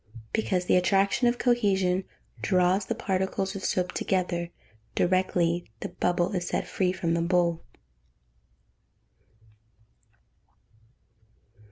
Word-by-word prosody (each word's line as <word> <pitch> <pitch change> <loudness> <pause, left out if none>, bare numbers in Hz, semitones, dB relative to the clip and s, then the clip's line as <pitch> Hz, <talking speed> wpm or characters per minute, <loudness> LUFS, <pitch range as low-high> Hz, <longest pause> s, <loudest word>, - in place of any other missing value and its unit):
_ - - -11
Because 185 -5 0
the 180 - +4
attraction 195 +6 +2
of 240 0 +2
cohesion 195 -7 +2 0.4
draws 185 +1 +2
the 230 - -1
particles 190 0 -1
of 195 - -6
soap 180 -1 0
together, 175 -2 -1 0.5
directly 175 -3 +1
the - - -4
bubble 175 +1 0
is 180 -3 -2
set - - -1
free 185 -2 0
from 175 -3 -1
the 170 - +1
bowl. 170 -1 +1
185 Hz, 110 wpm, -27 LUFS, 175-195 Hz, 0.5 s, the